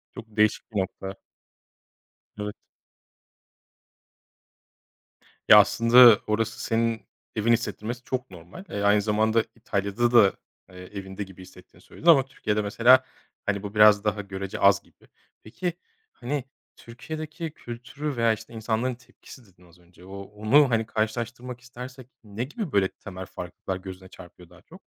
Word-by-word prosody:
Çok - - -8
değişik 105 +2 +1
bir 105 - -1
nokta. 95 +1 -6 1.2
Evet. 105 0 -4 2.9
Ya, - - +10
aslında 115 -1 +7
orası 110 +2 -1
senin 115 0 -1 0.3
evin 110 +2 +2
hissettirmesi 115 +2 -3
çok 130 0 -4
normal. 90 - -12
Eee, 100 - -4
aynı 105 +1 +4
zamanda 110 +2 +2
İtalya'da 110 +1 -1
da, 110 -5 +6 0.4
eee, 90 - -16
evinde 95 +2 -7
gibi 95 -1 -13
hissetiğini 90 - -16
söyledin. 170 - -10
Ama 140 -6 +7
Türkiye'de 105 -5 -2
mesela, 120 +5 +5 0.4
hani, 100 -1 -1
bu 100 +1 -7
biraz 105 -1 +6
daha 105 -1 -1
görece 95 -1 -6
az 100 -1 +5
gibi. - - -26 0.4
Peki, 175 +11 -4 0.4
hani, 140 +2 -4 0.3
Türkiye'deki 155 +7 -7
kültürü 130 +4 -7
veya, 115 -1 +3
işte, 110 - -10
insanların 115 +3 -2
tepkisi 130 0 -16
dedin 90 -3 -23
az 85 +1 -22
önce. 90 0 -19
O, 95 +1 -10
onu 110 +8 +3
hani 115 -2 +1
karşılaştırmak 120 +3 -4
istersek 125 +1 -10 0.2
ne 105 +2 -5
gibi 155 - -5
böyle 100 -2 +3
temel 95 -1 -10
farklılıklar 90 +1 -6
gözüne 95 0 -10
çarpıyor 90 0 -15
daha - - -18
çok? - - -16
110 Hz, 140 wpm, -25 LUFS, 100-120 Hz, 2.9 s, Ya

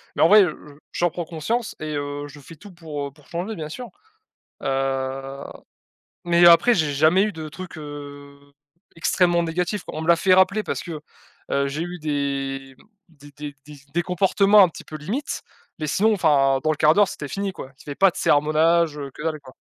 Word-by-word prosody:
Mais - - -1
en 160 - +7
vrai, 210 +1 +8
heu, 175 - -2 0.4
je - - -6
j'en 175 0 +3
prends 175 +1 -5
conscience 195 +9 -3
et 155 -1 -4
heu, 145 0 -4
je 145 0 -13
fais 165 +4 -13
tout 205 +3 -13
pour, 155 -5 -6
heu, - - -11
pour 145 +1 -23
changer, 180 +6 -4
bien 155 -3 -6
sûr, 240 +8 -8 0.7
heu. 135 0 -2 0.8
Mais 175 0 +5
après, 170 +8 +7
j'ai 155 -6 +1
jamais 160 +7 +4
eu 215 - -1
de 160 -3 -7
trucs, 175 +2 -9
heu, 145 -1 -9 0.6
extrêmement 175 +1 +2
négatifs. 180 +4 -2
On 155 - -5
me 160 - -5
l'a 170 - +6
fait 185 +1 +3
rappeler 190 +3 +4
parce - - -3
que, 165 -4 -6 0.5
heu, 140 0 +1
j'ai 150 +4 -4
eu 175 +1 -6
des, 135 -2 -3
mmh, - - -21 0.3
des 145 +1 -15
des 145 0 -8
des 150 - -11 0.2
des 175 - +1
comportements 195 +4 +4
un - - +5
petit - - -11
peu 155 - -9
limite, 205 - -4 0.4
mais 155 - -3
sinon, 215 +8 +2
enfin, 140 -7 +3
dans 155 - +1
le 150 - -3
1/4 155 0 +5
d'heure, 205 0 +4
c'était 145 - -6
fini 200 +5 -3
quoi. 135 -7 -10
C'était 145 -1 -8
pas 195 -1 +5
de - - -25
sermonages, 155 +2 +2 0.2
que - - -11
dalle, 155 -2 -2
quoi. 130 -2 -14
155 Hz, 205 wpm, -23 LUFS, 145-180 Hz, 0.8 s, vrai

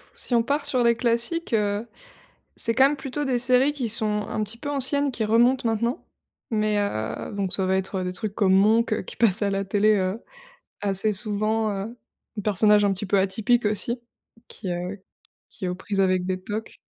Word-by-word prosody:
si 245 - -3
on 230 - +3
part 285 +4 -1
sur 255 -4 +1
les 235 0 +4
classiques, 235 +6 -1
heu, 210 +1 0 0.7
c'est 230 - -1
quand 265 +2 +6
même 295 - -2
plutôt 280 +2 -4
des 255 -3 0
séries 255 +3 +3
qui 260 -6 -3
sont 210 -1 -1
un 215 - -2
petit 225 +3 -9
peu 290 +2 -5
anciennes 280 +1 0
qui 225 -3 -2
remontent 240 +3 +3
maintenant. 235 +3 -1 0.5
Mais, 215 -2 +1
heu, 110 - -3
donc 195 -2 -2
ça 190 - +1
va 190 0 +2
être, 190 0 -2
heu, - - -3
des 180 - -3
trucs 205 +2 -4
comme 190 -2 +3
Monk, 215 +4 +3
heu, - - 0
qui - - -11
passe 220 -2 +2
à 200 - +1
la 195 0 -1
télé, 210 +2 +3
heu, 190 +3 -2 0.6
assez 205 +1 +1
souvent, 215 +1 +1
heu, 205 +4 -5 0.4
un - - 0
personnage 210 +1 +4
un 200 - +3
petit 195 +2 -4
peu 200 - +2
atypique 220 +4 +1
aussi 235 +4 -1 0.5
qui, 195 - -7
heu, 180 +3 -4 0.5
qui - - -7
est - - -1
aux 180 - -2
prises 195 +1 -2
avec 185 -1 +2
des 185 0 -2
tocs. 215 +2 -5
215 Hz, 210 wpm, -24 LUFS, 195-235 Hz, 0.7 s, quand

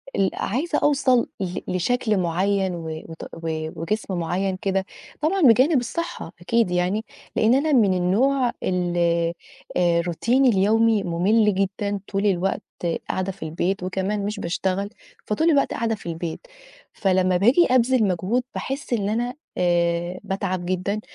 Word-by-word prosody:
ال 195 -1 +2
عايزة 295 - -1
أوصَل 260 -4 +3
ل 180 -2 -3
لشكل 215 +4 0
معيّن 185 +2 0
و 165 -1 -6 0.2
وت 165 - -9
و 160 -1 -4
وجسم 205 +3 -2
معيّن 185 +3 -1
كده، 195 -1 -1 0.4
طبعًا 370 +6 +1
بجانب 260 +2 +5
الصحّة 335 +8 -5
أكيد 225 +1 +1
يعني، 180 +5 0 0.3
لإن 225 +2 +4
أنا 300 +3 +1
من 215 -8 +4
النوع 240 +9 +2
ال 180 -1 -1 0.8
آآ 170 -1 +3
روتيني 235 +10 +2
اليومي 220 +1 +3
مُمِل 200 +5 +2
جدًا، 195 +1 -1
طول 200 +1 -1
الوقت 190 -1 +1 0.5
قاعدة 190 +1 -1
في 190 -3 -10
البيت، 175 +4 -2
وكمان 195 +2 -2
مش 210 0 -3
باشتغل، 190 +3 -1 0.4
فطول 320 +11 +1
الوقت 280 -2 +2
قاعدة 225 -1 -1
في 185 -4 -8
البيت. 165 0 -4 0.5
فلمّا 185 -2 +2
باجي 245 - +5
أبذِل 255 -1 +4
مجهود، 190 +7 0
باحِس 270 -2 -4
اللي 205 -2 0
أنا 240 +2 -1 0.2
آآ 175 0 +1
باتعب 185 -2 -3
جدًا، 185 +3 -1
195 Hz, 140 wpm, -23 LUFS, 180-230 Hz, 0.8 s, بجانب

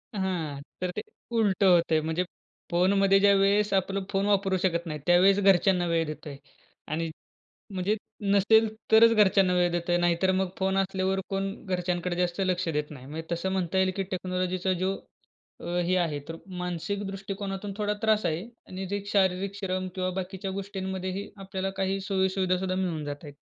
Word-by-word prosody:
हां. 170 -8 -2 0.2
तर 180 -1 -1
ते - - -2 0.4
उलटं 200 -2 +3
होतंय, 165 -2 +3
म्हणजे 160 +3 -1 0.5
फोनमध्ये 195 +3 +4
ज्यावेळेस 200 +1 +4
आपलं 195 0 0
फोन 195 0 +1
वापरू 195 -2 +2
शकत 170 -2 +1
नाही, 150 -1 -4
त्यावेळेस 185 +3 +5
घरच्यांना 190 -2 +4
वेळ 165 -1 +1
देतोय. 150 -1 -7 0.5
आणि 165 +2 -2 0.6
म्हणजे 190 +3 0 0.4
नसेल 220 +3 +5 0.2
तरच 225 +1 +8
घरच्यांना 195 -3 +4
वेळ 175 0 +3
देतोय. 175 0 0
नाहीतर 175 +2 +2
मग 190 -1 0
फोन 190 0 0
असल्यावर 190 0 0
कोण 195 0 -1
घरच्यांकडे 180 -1 -1
जास्त 180 +1 -1
लक्ष 185 -1 0
देत 150 -1 -2
नाही. 130 -3 -10
म्हणजे 160 +4 -7
तसं 170 +3 -1
म्हणता 190 -1 -1
येईल 190 0 +3
की 195 - -1
टेक्नॉलॉजीचा 185 0 -1
जो 190 +1 +1 0.7
अ, - - -8 0.2
हे 185 +2 +2
आहे 155 -4 -1
तर 165 - -5 0.2
मानसिक 180 +3 -3
दृष्टिकोनातून 195 0 -5
थोडा 210 -1 0
त्रास 220 -1 +2
आहे 160 +2 0 0.3
आणि 190 +1 -5
जे 200 +1 -2
शारीरिक 190 0 +1
श्रम 185 -2 -2
किंवा 185 -1 -1
बाकीच्या 190 +1 -4
गोष्टींमध्येही 190 0 -4
आपल्याला 195 0 -3
काही 195 0 0
सोयीसुविधा 190 -1 +1
सुद्धा 185 0 -2
मिळून 175 -5 -1
जात 145 +1 -6
आहेत. 145 -2 -9
190 Hz, 165 wpm, -27 LUFS, 175-195 Hz, 0.7 s, तरच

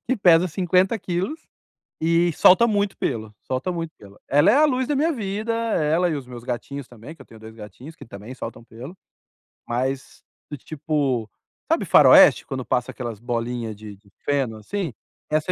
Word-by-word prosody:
que 260 +1 0
pesa 175 -3 +5
50kg 185 - -1 0.5
e 170 +1 +2
solta 190 +9 +6
muito 205 -3 0
pelo, 110 -4 -3
solta 130 +8 -3
muito 165 -2 -4
pelo. 100 0 -16
Ela 145 +6 +4
é - - +4
a 305 - +5
luz 260 -3 0
da 295 - +1
minha 320 +4 +2
vida. 215 -1 -3
Ela 180 -7 +1
e 160 - -1
os 135 -3 -7
meus 120 -2 -10
gatinhos 135 +2 -5
também, 120 +6 -12
que - - -29
eu - - -20
tenho 110 - -15
2 110 0 -12
gatinhos, 115 - -11
que - - -12
também 105 +3 -10
soltam 115 -2 -8
pelo. 125 +11 -11 0.7
Mas 130 +3 -3 0.3
do 145 - -5
tipo, 140 -6 -2 0.4
sabe - - +2
faroeste, - - +7
quando 130 -1 -5
passa 125 0 -1
aquelas 115 -5 -7
bolinhas 120 -2 -3
de 105 0 -10
de 100 0 -26
feno, 135 -6 -1
assim? 165 - -4 0.4
Essa 155 +3 0
145 Hz, 180 wpm, -23 LUFS, 120-185 Hz, 0.7 s, faroeste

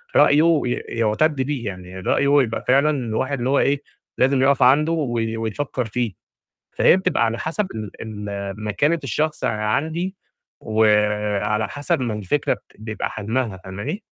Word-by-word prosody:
رأيه 155 +1 +5
ي - - -1
يعتد 115 +7 0
بيه 135 -3 -2
يعني 90 -2 -7
رأيه 140 +9 +3
يبقى 115 -2 -4
فعلًا 140 +4 +4
الواحد 130 0 -1
اللي 125 +1 -1
هو 140 - +3
إيه؟ 140 0 +2 0.4
لازم 130 +1 +3
يقف 135 0 +4
عنده 145 +6 +5
وي 120 -8 -1
ويفكر 120 +3 -3
فيه، 115 -1 -2 0.6
فهي - - +5
بتبقى، 185 -9 +1
على 115 0 -1
حسب 165 +10 -2
ال 110 -2 -5
ال 100 -2 -5
مكانة 145 +11 +1
الشخص 150 +3 -1
عندي، 155 - -1 0.4
وعلى 105 -1 +1
حسب 145 +1 -1
ما 120 -4 -1
الفكرة 105 +7 0
بت - - -18 0.2
بيبقى 110 0 -4
حجمها، 110 0 -2
فاهماني؟ 100 - -5
120 Hz, 150 wpm, -22 LUFS, 105-145 Hz, 0.6 s, رأيه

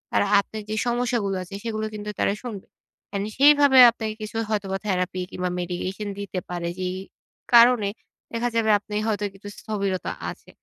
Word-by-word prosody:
তারা - - +4 0.2
আপনার 215 +2 -8
যে 215 - -1
সমস্যাগুলো 240 -4 0
আছে, 185 +2 -9
সেগুলো 220 -2 -2
কিন্তু 210 0 -6
তারা - - +2
শুনবে। 215 -6 -7 0.4
অ্যান্ড 200 0 -2
সেইভাবে 285 -1 +6
আপনাকে 220 -1 -4
কিছু 215 +1 -5
হয়তোবা 200 -3 -1
থেরাপি 185 -1 -1
কিংবা 180 0 -2
medication 185 +4 -4
দিতে 200 -2 -4
পারে। 175 -1 -3
যেই 185 0 -2 0.6
কারণে 235 -3 +6 0.4
দেখা 235 +1 0
যাবে, 225 -1 +2
আপনার 210 0 -5
হয়তো 210 -1 0
কিছু 195 +1 -11
স্থবিরতা 200 -4 -2 0.2
আছে। - - -15
210 Hz, 160 wpm, -24 LUFS, 195-230 Hz, 0.6 s, সেইভাবে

